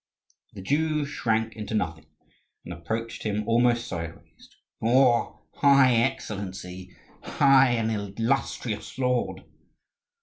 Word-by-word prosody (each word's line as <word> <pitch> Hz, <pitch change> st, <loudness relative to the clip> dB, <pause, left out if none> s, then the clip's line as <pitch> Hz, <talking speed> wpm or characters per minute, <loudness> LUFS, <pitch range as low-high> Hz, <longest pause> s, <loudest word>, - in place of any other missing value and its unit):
The 95 Hz, -, -9 dB
Jew 150 Hz, +4 st, 0 dB
shrank 110 Hz, -5 st, -1 dB
into 110 Hz, 0 st, -5 dB
nothing 80 Hz, -7 st, -3 dB, 0.6 s
and 85 Hz, -, -6 dB
approached 110 Hz, +7 st, -5 dB
him 105 Hz, -1 st, -2 dB
almost 120 Hz, 0 st, +2 dB
sideways: 85 Hz, -5 st, -8 dB, 0.3 s
"Your 120 Hz, +1 st, +2 dB
high 140 Hz, -3 st, +5 dB
excellency! 95 Hz, -7 st, -3 dB, 0.2 s
High 135 Hz, -2 st, +4 dB
and 115 Hz, -1 st, 0 dB
illustrious 110 Hz, +2 st, -3 dB
lord!" 125 Hz, -2 st, -1 dB
115 Hz, 100 wpm, -26 LUFS, 100-130 Hz, 0.6 s, high